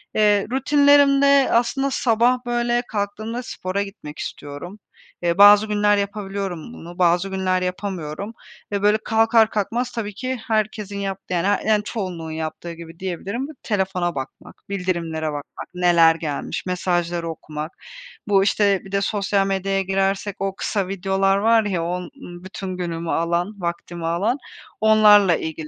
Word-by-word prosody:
Eee, 205 -2 +3
rutinlerimde 280 0 +5
aslında 245 +4 +1
sabah, 245 +1 +2
böyle, 240 0 +1
kalktığımda 215 +4 -3
spora 195 -2 -3
gitmek 195 -7 -10
istiyorum. 145 +8 -7 0.4
Eee, 170 +1 +1
bazı 205 +1 +8
günler 205 0 +2
yapabiliyorum 200 -1 -4
bunu, 175 -3 -11
bazı 175 +2 +3
günler 185 -1 0
yapamıyorum 185 +1 -4 0.4
ve, 200 -1 -1
böyle, 210 +1 +4
kalkar 225 0 +3
kalkmaz 230 +4 -2
tabii 210 -3 -4
ki 255 +3 -3
herkesin 215 -2 -1
yaptığı 195 -1 -4
yani 175 +2 +1
her 205 - +1
yani 210 -1 +2
çoğunluğun 180 -7 -5
yaptığı 160 +2 -5
gibi 165 0 -12
diyebilirim: 195 +8 -4 0.2
telefona 190 -5 -1
bakmak, 130 0 -7
bildirimlere 170 -5 -2
bakmak, 145 -1 -6
neler 170 -2 +5
gelmiş, 155 +1 -4
mesajları 175 -2 -1
okumak. 155 0 -6 0.6
Bu 195 -1 +4
işte 200 -2 +2
bir 190 - -11
de 200 0 +1
sosyal 200 -1 0
medyaya 195 0 0
girersek 195 +1 -1
o 195 0 -2
kısa 200 -3 -2
videolar 195 +1 +1
var 225 +2 +4
ya, 180 -5 -1
on 180 +1 -2
ııı, 175 0 -11
bütün 185 -1 -6
günümü 170 -2 -3
alan, 170 +4 0
vaktimi 170 0 -4
alan, 200 +10 0 0.4
onlarla 210 -4 +6
ilgili 160 -1 -5
195 Hz, 145 wpm, -22 LUFS, 175-215 Hz, 0.6 s, bazı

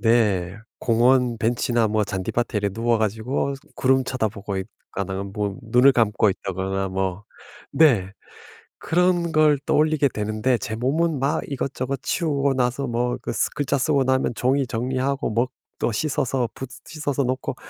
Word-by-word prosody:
네. 105 -6 +2 0.2
공원 120 0 +3
벤치나 120 -1 +1
뭐 105 0 +1
잔디밭에 105 +4 -2
이래 100 0 0
누워 115 +2 +1
가지고 110 +6 -1 0.2
구름 130 0 +3
쳐다보고 105 -6 -3
있거나 95 -1 -5
뭐 100 0 -3
눈을 125 +4 +5
감고 110 -3 +3
있다거나 95 0 -3
뭐 95 +1 -2 0.5
네. 110 - +4 0.7
그런 175 0 +1
걸 155 -2 +5
떠올리게 150 -1 +3
되는데 110 +4 0
제 110 +2 -4
몸은 145 +5 0
막 145 +4 0
이것저것 135 -1 -3
치우고 140 -5 0
나서 125 +2 0
뭐 120 +1 -1
그 - - -4
쓰 - - +1
글자 140 -1 -1
쓰고 140 +1 +2
나면 130 -1 +1
종이 135 +2 +1
정리하고 130 +3 -1
먹 120 +3 +1 0.3
또 115 - +1
씻어서 130 -2 0
붓 135 -1 -6 0.2
씻어서 145 -3 -2
놓고 130 +1 -2
125 Hz, 295 characters per minute, -23 LUFS, 105-140 Hz, 0.7 s, 눈을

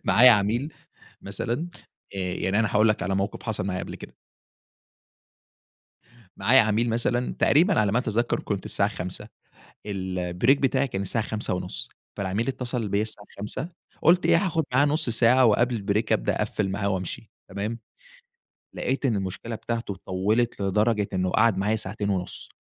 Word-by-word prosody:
معايا 125 +6 +7
عميل 115 +8 +2 0.5
مثلًا 120 - -3 0.5
آآ، - - -3 0.2
يعني 95 +3 0
أنا 115 - +2
هاقول 110 +1 +5
لك 105 -3 +1
على 95 +2 -1
موقِف 100 +2 -2
حصل 110 -4 -2
معايا 95 -1 -2
قبل - - -7
كده. - - -11 2.2
معايا 130 +3 +5
عميل 110 +2 +1
مثلًا، 120 +2 0
تقريبًا 170 - +4
على 105 -1 +1
ما 120 - +3
أتذكَّر، 120 -1 0
كنت 100 -3 -4
الساعة 100 - +1
17:00، 90 +3 -6 0.6
الbreak 95 +5 0
بتاعي 135 0 +1
كان 95 -4 -3
الساعة 110 +3 -1
17:30، 90 - -3 0.3
فالعميل 100 +4 -1
اتصَّل 125 -4 -2
بيَّا 100 +2 +1
الساعة 110 -2 -3
17:00، 105 - -3 0.3
قُلت 175 +3 +4
إيه، - - +5
هاخُد 160 -2 0
معاه 140 +3 +5
نُصّ 150 -3 +1
ساعة 120 +2 +4
وقبل 120 +2 +3
الbreak 100 +3 -1
أبدأ - - +1
أقفّل 100 -3 -1
معاه 100 +1 -1
وأمشي. 95 -2 -4 0.2
تمام؟ 105 +4 -4 1.0
لقيت 135 +1 -1
إن 115 - +1
المشكلة 100 +4 -4
بتاعته 115 -3 -4
طوّلت 105 +6 0
لدرجة 105 +2 +1
إنه 95 -1 0
قعد 110 -2 +3
معايا 105 +3 +1
ساعتين 100 0 -3
ونُصّ. 90 -2 -4
110 Hz, 155 wpm, -25 LUFS, 100-120 Hz, 2.2 s, معايا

